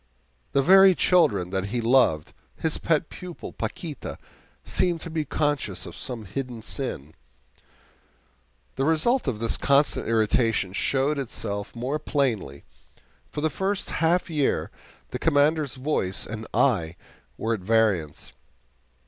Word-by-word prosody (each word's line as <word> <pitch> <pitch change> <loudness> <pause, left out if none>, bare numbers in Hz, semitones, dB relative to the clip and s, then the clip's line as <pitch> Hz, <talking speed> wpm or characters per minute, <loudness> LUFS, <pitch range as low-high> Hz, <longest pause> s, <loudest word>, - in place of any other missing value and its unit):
The 140 - +3
very 190 +3 +7
children 140 - +3
that 95 0 -1
he 115 +5 -2
loved 115 - +3 0.2
his 160 -1 -1
pet 160 -1 +1
pupil, 180 -2 -9
Paquita 170 -6 -5 0.5
seemed 175 -2 +1
to 165 - -6
be 160 -1 -1
conscious 135 - -1
of - - -9
some 120 -4 -5
hidden 125 +1 -5
sin. 80 - -4 1.6
The 135 - +1
result 160 - +2
of 125 -5 0
this 115 +1 -1
constant 140 +1 +2
irritation 110 -3 +1
showed 140 +7 0
itself 100 -6 -5
more 130 +6 -2
plainly. 115 - -1 0.7
For 150 - -5
the 160 0 +1
first 195 +5 -1
half 170 +2 +1
year 150 -5 0 0.4
the 125 - -5
Commander's 150 -1 +2
voice 130 -9 -2
and 110 0 -7
eye 90 -11 +2 0.4
were 115 +1 -1
at 110 - -2
variance. 95 -7 0
135 Hz, 130 wpm, -25 LUFS, 110-155 Hz, 1.6 s, very